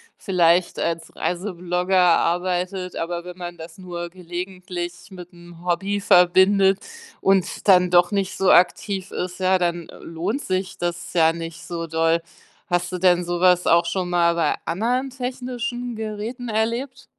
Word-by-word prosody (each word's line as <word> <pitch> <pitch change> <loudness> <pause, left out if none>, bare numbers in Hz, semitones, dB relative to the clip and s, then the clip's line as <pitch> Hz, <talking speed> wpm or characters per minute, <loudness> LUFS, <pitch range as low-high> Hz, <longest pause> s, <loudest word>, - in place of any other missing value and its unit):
vielleicht 175 -2 +2
als 165 0 -3
Reiseblogger 180 0 -1
arbeitet, 180 +1 +1
aber 170 +1 -4
wenn 180 0 -9
man 175 -1 -7
das 160 0 -11
nur 175 -2 -6
gelegentlich 180 0 -6 0.2
mit 180 -1 -11
'n 175 0 -15
Hobby 195 +3 0
verbindet 190 +1 +4 0.4
und 195 0 +1
dann 180 -2 +6
doch 175 0 +4
nicht 195 -2 -1
so 190 - +3
aktiv 190 +1 +2
ist, 180 0 -4
ja, 185 0 +3
dann, 175 -2 -2
äh, - - -12
lohnt 175 +10 -3
sich 185 0 -3
das 175 0 -4
ja 165 -2 +4
nicht 165 0 -7
so 165 -1 -4
doll. 165 +1 +1 0.5
Hast 175 -2 0
du 180 - -3
denn 180 -1 +3
so 175 0 -3
was 180 -1 +4
auch 170 +1 +4
schon 185 -2 -2
mal 170 -1 +3
bei 170 - +1
anderen 245 +9 -1
technischen 245 -1 -4
Geräten 220 +3 -5
erlebt? 235 +5 -2
180 Hz, 155 wpm, -22 LUFS, 175-195 Hz, 0.5 s, dann